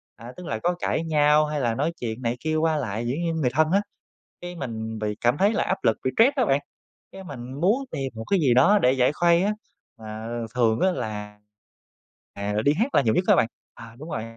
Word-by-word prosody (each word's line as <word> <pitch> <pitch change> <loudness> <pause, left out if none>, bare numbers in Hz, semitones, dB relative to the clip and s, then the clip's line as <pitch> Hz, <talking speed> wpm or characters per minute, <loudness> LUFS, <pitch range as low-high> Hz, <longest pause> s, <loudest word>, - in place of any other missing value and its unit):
À, 120 +2 -10
tức 180 - -9
là 110 -5 -3
có 175 0 +1
cãi 165 - -1
nhau, 150 -1 +3
hay 150 -1 -3
là 120 -3 0
nói 145 +7 0
chuyện 115 0 -4
này 120 -1 -1
kia 155 0 -2
qua 160 0 +1
lại, 115 -4 -3
dĩ 125 - -1
nhiên 170 -1 -1
người 150 -6 +1
thân 155 +2 +2
á, 200 +2 +3 0.6
cái, 175 0 -7
mình 110 -6 -5
bị 105 -1 -2
cảm 120 +4 +2
thấy 205 +4 +3
là - - +1
áp 190 - -1
lực, 110 - +2
bị 130 - +1
stress 265 +5 +5
á 255 -5 +2
bạn, 140 -5 +2 0.5
cái, 190 0 -10
mình 130 -5 -8
muốn 220 +11 +2
tìm 135 -1 -4
một 110 0 -6
cái 195 -3 +3
gì 130 -5 +3
đó 200 +12 +5
để 125 -6 +3
giải 130 +1 +2
khuây 170 +2 +3
á, 205 - +1 0.5
mà 110 +1 -7 0.3
thường 115 -2 +2
á 190 - +3
là, 105 -5 -5 1.0
à, 100 +1 -3
là 105 - 0
đi 145 +6 +3
hát 230 - -1
là - - +6
nhiều 110 -4 +1
nhất 180 - +2
đó - - +6
bạn 115 - +3 0.3
à, 115 0 -12
đúng 155 +3 -9
rồi. 110 - -3
135 Hz, 245 wpm, -24 LUFS, 115-170 Hz, 1.0 s, là